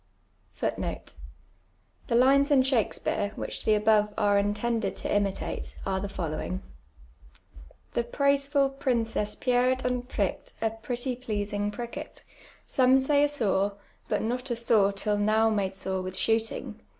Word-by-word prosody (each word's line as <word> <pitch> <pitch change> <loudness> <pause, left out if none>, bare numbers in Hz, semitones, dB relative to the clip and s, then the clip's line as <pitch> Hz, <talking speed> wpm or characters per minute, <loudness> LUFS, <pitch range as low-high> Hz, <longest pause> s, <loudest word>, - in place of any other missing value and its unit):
Tlic - - -3 1.0
lines 270 +4 +5
in 275 -3 +5
Shakspeare, 220 -4 0
whicb - - -4
tbe 215 -1 +4
above 210 -1 +3
are 205 -2 +3
intended 210 +3 -1
to - - -5
imiute, 200 -1 -1
are 190 -1 0
the 200 +1 -4
following: 155 - -4 0.6
— 70 -2 -22
''The 235 - 0
praiseful 280 0 +2
princess 225 -5 0
pierr'd 255 +1 +1
and 250 0 -1
prirk'd - - -2
a 225 -1 0
pretty 245 +3 -3
pleasintj 205 -4 -2
prirket; 240 +1 -7 0.4
Some 260 0 +4
.say 285 +2 +3
a 290 - +3
sore; 205 -7 0 0.3
but - - 0
not 250 +4 -2
a 240 - 0
sore 220 -4 +3
till 205 +1 -1
now 220 +2 +3
made 195 -3 -1
sore 190 -1 -2
with. 185 0 -6
^hooting. 225 +1 -1
225 Hz, 140 wpm, -28 LUFS, 205-250 Hz, 1.0 s, lines